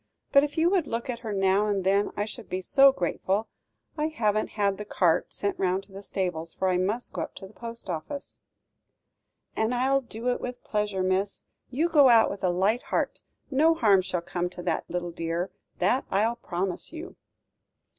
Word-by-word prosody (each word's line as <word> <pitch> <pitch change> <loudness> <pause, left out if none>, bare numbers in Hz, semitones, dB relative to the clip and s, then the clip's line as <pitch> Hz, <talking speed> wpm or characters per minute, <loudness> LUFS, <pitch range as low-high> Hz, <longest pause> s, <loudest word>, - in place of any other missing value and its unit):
But, 280 -1 +7
if 295 +1 -3
you 335 +2 +4
would 365 -6 +2
look 235 +2 -2
at 235 - -6
her 225 -3 -5
now 195 +1 +2
and 200 -2 0
then 200 +2 +2
I 205 - 0
should 220 0 -9
be 185 - -2
so 275 +8 +6
grateful. 195 0 -1 0.5
I 305 - +2
haven't 215 -8 0
had 200 -1 +1
the - - -3
cart, 175 -5 +1
sent 200 0 -2
round 190 +1 +1
to 195 - -19
the 195 +1 -8
stables, 175 -5 -3
for 190 - +1
I 180 - +2
must 210 +7 -2
go - - -3
up - - -5
to 195 - -9
the 190 - -14
post 230 0 -8
office." 185 - -5 1.2
"And 220 +3 +1
I'll 270 +2 +2
do 235 -1 -4
it 245 - -1
with 250 0 -6
pleasure, 210 -3 -1
miss. 190 +2 0 0.3
You 295 +7 +1
go 295 -6 +6
out 230 -2 +6
with 200 - -7
a 185 - +3
light 195 +7 +2
heart; - - -2 0.3
no 315 +5 +4
harm 205 -9 +5
shall 185 -1 -2
come 175 +1 -2
to 180 0 -9
that 170 -2 -2
little 175 -1 -3
dear, 170 +2 -3 0.3
that 225 +9 +2
I'll 220 +4 +2
promise 180 -4 -3
you." 335 +3 -8
205 Hz, 200 wpm, -27 LUFS, 185-245 Hz, 1.2 s, But